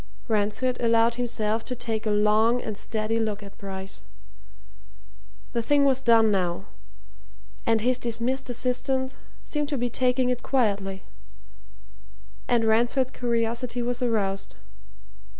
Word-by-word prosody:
Ransford 220 +3 +1
allowed 230 0 +4
himself 225 -2 -1
to 250 - -3
take 225 -2 -3
a - - +2
long 215 +3 +3
and 215 -3 -5
steady 220 +2 -1
look 215 -2 -2
at 200 - -11
Bryce. 190 - -7 1.5
The 235 - +1
thing 285 +4 +3
was 265 -1 +3
done 225 -3 +5
now, 185 -1 0 1.0
and 225 -1 +3
his 250 +2 +1
dismissed 240 +3 -2
assistant 260 +2 -1 0.3
seemed 295 -1 -2
to 285 - -1
be 245 -1 -1
taking 250 +1 +2
it 245 -1 -2
quietly 200 -7 0 1.4
and 235 -2 +2
Ransford's 240 +4 +2
curiosity 235 +1 -1
was 245 +1 -2
aroused. 205 -5 -1
230 Hz, 125 wpm, -26 LUFS, 215-250 Hz, 1.5 s, done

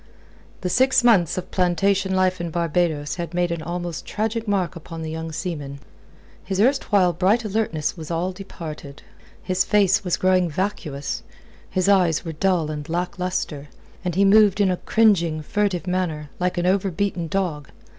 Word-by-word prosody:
The 180 - -2
six 260 +2 +4
months 195 -10 +4
of 185 - -5
plantation 190 +1 +1
life 185 -1 +1
in 170 - -3
Barbados 165 -2 -1
had 175 -1 -5
made 175 -1 +1
an 170 -1 -3
almost 175 0 -4
tragic 225 +1 -2
mark 190 -3 0
upon 165 0 -8
the 160 - -4
young 160 0 -5
seaman. 150 -5 -5 0.7
His 190 -1 -3
erstwhile 205 -7 +3
bright 195 +7 +2
alertness 200 -8 -1
was 160 -3 -8
all 170 +2 -1
departed. 160 -7 -9 0.4
His 185 0 +1
face 200 -1 +3
was 180 -2 0
growing 185 -2 +2
vacuous, 155 -5 -3 0.5
his 185 0 0
eyes 180 -5 +3
were 165 - -4
dull 165 -1 +1
and 150 +1 -6
lack 180 +3 -2
lustre, 160 -5 -3 0.3
and 180 -3 -2
he 200 +1 +4
moved 205 0 +5
in 195 -2 +3
a 180 - -1
cringing, 170 -10 +2
furtive 200 0 -1
manner, 170 -6 -2
like 180 0 -1
an 175 - 0
over 195 +1 +2
beaten 180 -1 -2
dog. 160 -5 -2
180 Hz, 165 wpm, -23 LUFS, 165-195 Hz, 0.7 s, moved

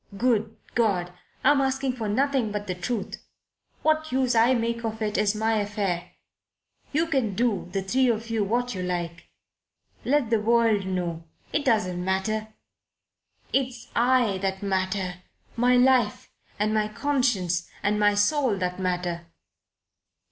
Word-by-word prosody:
Good 225 -2 +1 0.2
God! 185 -6 +1 0.3
I'm 280 +1 +5
asking 265 -1 0
for 225 -4 -4
nothing 265 0 +1
but 205 0 -3
the 185 - -2
truth. 195 +4 -4 0.6
What 310 0 +1
use 255 -1 +2
I 235 +3 +4
make 235 0 -1
of 220 -1 -3
it 210 -1 -2
is 210 0 +2
my 220 +1 +1
affair. 200 -4 -2 0.8
You 315 +3 +2
can 265 - 0
do 220 -5 0
the 195 0 -2
three 255 +7 +2
of 230 0 -2
you 225 -2 +1
what 245 +4 -1
you 185 - -4
like. 175 -2 -4 0.8
Let 270 -4 +1
the 225 -2 +3
world 225 -3 +3
know. 175 -3 -3 0.3
It 295 - 0
doesn't 185 -8 +1
matter. 190 +4 -1 1.1
It's 255 -3 -1
I 240 -5 +3
that 190 0 -2
matter 185 -2 -1 0.3
my 245 +2 +3
life 250 -4 +3 0.3
and 215 +1 +1
my 215 -1 +1
conscience 215 -9 0
and 210 +1 +1
my 205 0 +4
soul 230 +1 +2
that 180 0 -2
matter." 180 -2 -2
215 Hz, 145 wpm, -26 LUFS, 190-245 Hz, 1.1 s, I'm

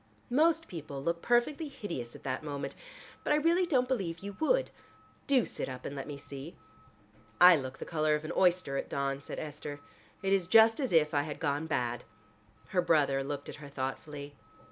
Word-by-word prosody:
Most 325 +4 +3
people 145 -5 -7
look 170 +2 -1
perfectly 260 +6 +2
hideous 170 - -6
at - - -12
that 130 -1 -2
moment, 145 -2 -4 0.5
but - - +2
I - - +5
really 335 +4 +3
don't 255 -6 +2
believe 195 -10 -1
you 200 0 -6
would. - - +2 0.6
Do 265 -5 +4
sit - - -4
up 130 -1 -7
and 140 - -5
let 135 - -5
me 145 -2 -6
see. 140 +3 -9 0.8
"I 180 0 +10
look 130 -3 -4
the - - -6
color 155 -2 +1
of 150 +1 -4
an - - -4
oyster 180 -6 +2
at - - -3
dawn," 140 0 -1
said - - -7
Esther, 145 -1 -6 0.4
"it 195 0 +2
is 190 -4 +2
just 225 +4 +6
as 265 -3 -1
if 155 -3 +4
I 145 - +3
had 150 0 -5
gone 145 +1 -1
bad." 120 -5 -1 0.7
Her 180 - +2
brother 145 -5 +3
looked 140 0 -5
at - - -8
her 145 -1 -10
thoughtfully. 140 +2 -5
155 Hz, 195 wpm, -31 LUFS, 140-220 Hz, 0.8 s, I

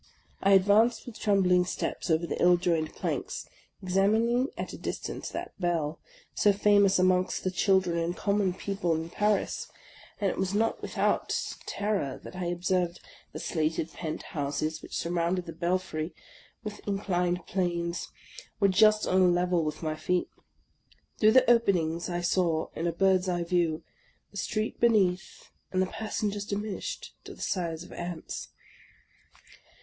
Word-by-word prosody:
I 195 +1 +5
advanced 205 +5 +4
with 245 - -9
trembling 185 -3 +3
steps 180 - -3
over 160 +1 +2
the - - -4
ill 175 0 +6
joined 165 -3 0
planks, - - -3 0.4
examining 220 +7 +2
at - - -4
a - - -6
distance - - -4
that - - -6
bell, 165 -3 0 0.3
so 205 - +4
famous 200 -1 +4
amongst 185 0 +2
the 185 - 0
children 185 -2 +2
and 170 +2 -2
common 200 -3 +1
people 190 -4 -1
in 160 +1 -4
Paris; 210 0 0 0.5
and 200 -3 +1
it - - -6
was 190 +1 0
not 225 +2 +1
without - - 0 0.4
terror 200 -10 -1
that - - -10
I 180 -1 -3
observed 175 0 0 0.3
the - - -7
slated 160 -1 -1
pent 155 -3 -5
houses, 155 +1 -3
which - - -6
surrounded 175 +1 0
the 165 - -7
belfry 170 -1 -2 0.5
with 210 -2 -6
inclined 180 -3 0
planes, 175 -2 -1 0.5
were 200 -2 +4
just 215 +2 +5
on 185 - +3
a 185 - +6
level 175 -1 +2
with 155 +2 -4
my 155 -1 -1
feet. 180 +3 -1 0.9
Through 215 0 +6
the 260 - +6
openings 180 -9 +2
I 175 0 -2
saw, 175 -2 +1
in 170 - -1
a - - +1
bird's 185 +1 +2
eye 175 -1 0
view, 170 -2 0 0.5
the 200 - -10
street 215 +3 -2
beneath, 195 -6 +1 0.2
and 185 - 0
the 185 - +3
passen 215 +1 -3
gers 205 0 -4
diminished 210 - -4
to - - -9
the - - -13
si^e 170 -3 -2
of - - -12
ants. 175 -1 -6
180 Hz, 155 wpm, -28 LUFS, 170-200 Hz, 0.9 s, ill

